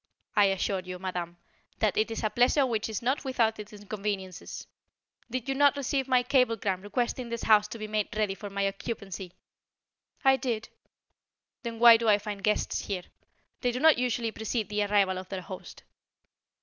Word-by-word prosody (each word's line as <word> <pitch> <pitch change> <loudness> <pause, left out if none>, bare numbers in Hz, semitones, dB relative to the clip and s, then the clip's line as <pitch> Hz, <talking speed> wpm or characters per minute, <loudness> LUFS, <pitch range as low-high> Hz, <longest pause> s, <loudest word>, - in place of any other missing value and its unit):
"I 205 -2 +6
assure 195 0 0
you, 185 0 -7
madame, 180 -2 -4 0.4
that 215 -3 +1
it 215 - +1
is 225 - -4
a 215 - +1
pleasure 255 +3 +4
which 225 -3 -1
is 220 +2 -4
not 260 +4 0
without 230 -5 +1
its 210 0 -8
inconveniences. 205 -3 -5 0.6
Did 250 +1 -4
you 270 - +1
not 285 +1 +4
receive 275 -1 -1
my 255 -1 +3
cablegram 230 -7 +1
requesting 240 +3 -2
this 235 0 -4
house 210 -1 +5
to 230 - -7
be 215 -1 -5
made 215 -1 0
ready 210 -2 +1
for 200 +2 -8
my 200 0 0
occupancy?" 195 -3 -6 0.9
"I 265 0 +6
did." 235 -4 -3 0.9
"Then 235 -2 -5
why 235 0 +9
do 230 -1 +1
I 205 - +6
find 205 -1 -6
guests 210 +1 0
here? 190 -3 -3 0.6
They 245 - +1
do 250 - -3
not 315 -2 +6
usually 240 -2 0
precede 220 0 -3
the 210 0 0
arrival 200 -2 +2
of 185 - -10
their 190 -2 -4
host." 185 0 -10
215 Hz, 180 wpm, -28 LUFS, 195-240 Hz, 0.9 s, why